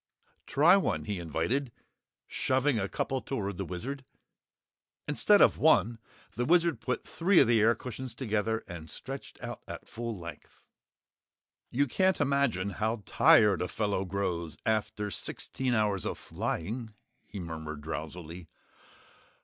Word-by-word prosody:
"Try 165 +7 +6
one," 195 - -1
he 105 -3 -3
invited, 85 - -1 0.5
shoving 130 -1 +1
a 95 -1 -2
couple 130 -1 -2
toward 100 -8 -3
the 95 - -3
Wizard. 130 - -5 1.0
Instead 200 +8 +5
of - - +4
one, 120 -7 +4 0.3
the 120 - -2
Wizard 170 -4 +3
put 125 - -3
three 180 +2 +2
of - - +7
the 115 -2 +4
air 115 +2 +5
cushions 125 +1 -7
together 110 -3 -1
and 80 -3 -8
stretched - - -8
out - - -6
at - - -8
full 115 -2 -5
length. 85 -3 -11 1.1
"You 140 +4 +2
can't 185 +7 +2
imagine 140 - +1
how 110 +2 -2
tired 100 -5 +5
a 90 - 0
fellow 100 -2 -1
grows 90 -4 -3
after 105 -2 -1
sixteen 125 - -2
hours 105 -3 +1
of - - -3
flying," 110 +5 -4 0.3
he 100 - -8
murmured 80 -3 -6
drowsily. 80 +3 -6
110 Hz, 135 wpm, -30 LUFS, 90-130 Hz, 1.1 s, of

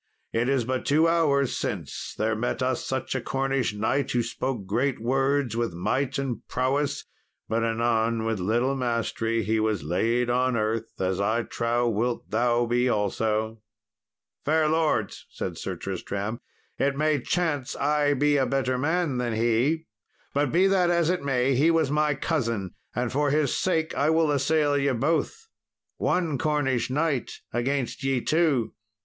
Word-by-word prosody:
It 115 +3 +1
is 135 -4 +1
but 130 +1 -2
two 155 +3 +3
hours 145 -5 +2
since - - -4
there 110 +1 +1
met 120 +3 -2
us 130 -1 0
such 130 0 -3
a 130 - -2
Cornish 135 -4 -1
knight, 130 +6 0
who 120 -1 +1
spoke 120 -2 -3
great 130 +6 0
words 135 +1 +1
with 115 -7 -1
might 130 +10 -1
and 135 -3 -3
prowess, 140 +3 -1 0.4
but 115 +1 0
anon, 115 0 +1
with 115 -3 -1
little 120 +8 +1
mastery, 115 -2 -1
he 110 +1 +1
was 110 -6 0
laid 115 +10 +1
on 125 0 +1
earth, 110 +1 -2
as 95 +1 0
I 110 +4 +1
trow 120 +1 0
wilt 115 +2 -1
thou 120 +2 +2
be 120 +2 +1
also." 110 +1 -1 0.8
"Fair 155 +1 +2
lords," 155 -9 0
said - - -5
Sir - - -4
Tristram, 105 +4 -4 0.4
"it 140 0 +1
may 155 -2 +2
chance 145 -4 -1
I 145 0 +2
be 145 +2 +3
a 135 -2 +2
better 130 -1 0
man 160 -2 0
than 120 -2 -1
he; 120 +8 +1 0.5
but, 145 -1 +1
be 180 +4 +4
that 190 -2 +3
as 170 -1 +2
it 180 - -1
may, 135 -1 +1
he 145 +6 +4
was 160 -4 +2
my 150 -1 +2
cousin, 115 - -2 0.2
and 120 0 -1
for 145 +2 +1
his 145 -1 +1
sake 160 -4 0
I 145 +2 +1
will 160 -1 +3
assail 145 +1 +2
ye 140 0 +2
both; 165 - -1 0.5
one 165 -7 0
Cornish 135 -5 0
knight 145 -2 0 0.2
against 130 +2 -1
ye 135 -1 +1
two." 150 -9 +1
130 Hz, 160 wpm, -26 LUFS, 115-145 Hz, 0.8 s, be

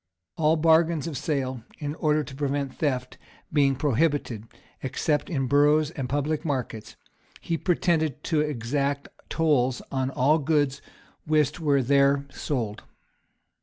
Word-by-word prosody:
All 155 0 +3
bargains 160 -1 +3
of 165 -3 -4
sale, 130 -3 -2 0.2
in 145 -2 -4
order 155 -1 +1
to 130 - -10
prevent 140 -1 -2
theft, 130 -4 -2 0.3
being 140 -2 +3
prohibited, 130 -4 0 0.3
except 150 +6 -1
in 135 -6 -1
boroughs 145 +3 +3
and 135 -6 -5
public 145 +3 -1
markets,[*] 125 -8 -4 0.4
he 165 - -2
pretended 165 -4 0
to 155 -3 +1
exact 140 0 -2 0.2
tolls 135 -6 +2
on 130 -1 0
all 140 +4 +2
goods 145 -2 +1 0.5
whist 150 0 +2
were 140 -4 +2
there 140 +1 +3
sold. 115 -8 -3
145 Hz, 130 wpm, -26 LUFS, 135-155 Hz, 0.5 s, All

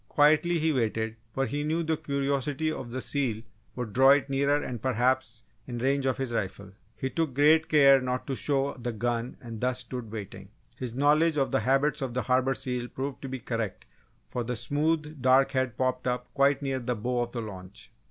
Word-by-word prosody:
Quietly 155 +4 +4
he 160 0 +1
waited, 110 -3 -1 0.2
for 135 +3 0
he 145 +5 -2
knew 160 +3 0
the 160 0 0
curiosity 140 0 -1
of 130 -6 -6
the 130 +2 -4
seal 120 -6 -1 0.3
would 120 -5 -5
draw 135 +3 +6
it 140 0 +4
nearer 140 +1 +2
and 125 -5 -5
perhaps, 125 -2 0 0.2
in 120 -2 -5
range 135 +2 +1
of 130 - 0
his 135 -3 -3
rifle. 100 -2 -3 0.2
He 130 +4 -3
took 160 -6 -1
great 155 +3 +4
care 140 -3 +6
not 125 0 -2
to 135 - -3
show 140 +1 0
the 120 -1 -5
gun 120 +2 -2
and 115 -4 -8
thus 125 0 0
stood 125 -3 -7
waiting. 100 -3 -8 0.3
His 125 -2 -6
knowledge 150 +3 +3
of 135 - +1
the - - +2
habits 135 +6 +1
of 130 -3 -3
the 125 - 0
Harbour 130 +1 +2
seal 125 -1 -3
proved 135 +1 -5
to 135 - -6
be 130 - -3
correct 115 -4 -4 0.4
for 120 - -3
the 125 +1 -3
smooth 150 +4 -1
dark 135 +1 +4
head 130 -2 -1
popped 130 -1 -1
up 125 0 -3
quite 140 +1 +3
near 135 -1 -1
the 125 0 -2
bow 120 +3 -1
of 120 0 -4
the 120 - -3
launch. 95 -1 -9
130 Hz, 205 wpm, -28 LUFS, 120-140 Hz, 0.4 s, draw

